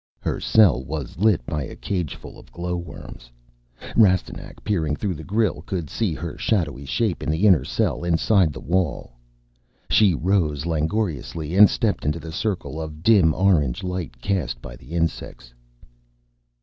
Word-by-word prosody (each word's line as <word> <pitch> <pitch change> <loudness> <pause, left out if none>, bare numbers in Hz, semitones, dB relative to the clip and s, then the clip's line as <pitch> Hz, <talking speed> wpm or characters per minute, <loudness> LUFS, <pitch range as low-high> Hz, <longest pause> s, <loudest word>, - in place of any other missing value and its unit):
Her - - -3
cell 90 - +4
was 75 +2 -6
lit 100 - +3
by 75 +3 -3
a 70 - -7
cageful 90 -7 -5
of - - -17
glowworms. 85 -8 -6 0.7
Rastignac, 95 -5 +1
peering 80 -8 0
through 95 +4 -2
the 80 -1 -8
grille, 100 -5 0
could 90 -4 -5
see 100 -8 -1
her 85 +1 -6
shadowy 80 - -1
shape 90 - -1
in - - -3
the 80 +6 +1
inner 95 -6 +5
cell - - -1
inside 85 +1 +3
the 65 - -8
wall. 85 -4 -1 0.8
She 100 -6 +5
rose 80 -4 0
langorously 80 - -2
and 105 +1 +8
stepped 110 -3 -1
into 75 +3 -1
the 80 - -8
circle 85 -4 -3
of 80 0 -8
dim 95 -8 +5
orange 85 -10 +2
light 90 -9 -4
cast 70 -9 -2
by - - -9
the - - -13
insects. 80 -7 -3
85 Hz, 150 wpm, -23 LUFS, 75-95 Hz, 0.8 s, and